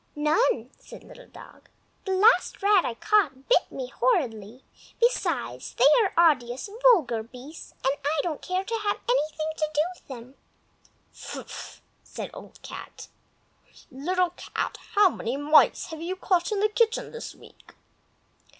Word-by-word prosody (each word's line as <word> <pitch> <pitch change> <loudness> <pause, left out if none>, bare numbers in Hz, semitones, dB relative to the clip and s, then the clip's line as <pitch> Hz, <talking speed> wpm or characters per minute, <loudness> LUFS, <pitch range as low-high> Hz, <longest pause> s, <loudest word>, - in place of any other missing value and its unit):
"None!" 295 -5 +1
said - - -13
Little - - -14
Dog. - - -15 0.4
"The 385 - -1
last 425 +1 +3
rat 400 -3 +5
I 235 - -3
caught 305 - +1
bit - - +3
me - - -6
horridly; 245 - -1 0.4
besides, 330 - -1
they 250 - +3 0.2
are 340 -5 +5
odious, 250 +6 -6
vulgar 310 - +4
beasts, 255 +7 -12
and 265 - +3
I 295 +2 0
don't 325 -4 -3
care 365 +1 -2
to 455 - -6
have 410 -1 0
anything 310 -9 0
to 310 -1 -1
do 295 - +4
with - - -23
them." 255 0 -10 0.8
"Fffff!" - - -9 0.2
said - - -8
Old - - -12
Cat. - - -10 0.8
"Little 350 +7 0
Cat, 355 - -4 0.2
how 410 -1 +7
many 240 +4 -4
mice 300 +2 +4
have 320 0 -7
you 355 +3 -3
caught 365 -1 0
in 410 -2 0
the 425 - +3
kitchen 450 +1 0
this 470 - -8
week?" - - -18
320 Hz, 150 wpm, -26 LUFS, 265-400 Hz, 0.8 s, how